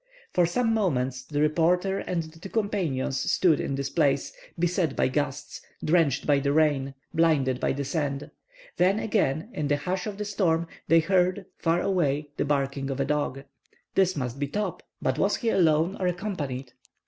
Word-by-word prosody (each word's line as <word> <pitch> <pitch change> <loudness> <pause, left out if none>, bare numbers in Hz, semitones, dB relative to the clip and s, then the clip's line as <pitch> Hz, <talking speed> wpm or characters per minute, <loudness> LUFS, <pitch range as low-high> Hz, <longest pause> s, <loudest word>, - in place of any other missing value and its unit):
For 175 -2 +4
some 225 +5 +1
moments 130 - 0
the 145 +2 -3
reporter 175 +5 +2
and 170 -2 -2
his 160 +1 -13
two 195 - -8
companions 180 - -1
stood 170 -5 +3
in 140 - -2
this 135 0 -3
place, 140 -4 +1 0.2
beset 175 -3 0
by - - +2
the - - 0
gusts, 145 0 -3 0.2
drenched 165 -3 +2
by 145 -2 +4
the 140 0 0
rain, 145 -3 +2 0.2
blinded 145 -6 +2
by - - +1
the 140 +1 -3
sand. 140 -2 -2 0.5
Then 185 +3 +3
again, 205 - 0
in 150 - -2
the 145 0 +2
hush 180 +5 -3
of 205 -2 -5
the 210 - -3
storm, 175 -5 +1 0.2
they 165 0 +6
heard, 185 +2 +1
far 165 +1 +2
away, 150 -6 0
the - - 0
barking 140 -1 -1
of 135 0 -3
a 135 - +1
dog. 145 -2 -1 0.5
This 185 -1 +3
must 130 -2 -3
be 145 - -1
Top. 210 +9 -3 0.2
But - - 0
was - - +2
he 230 - -1
alone 165 -1 +3
or 185 - +1
accompanied? 150 -9 -3
160 Hz, 185 wpm, -26 LUFS, 140-180 Hz, 0.5 s, they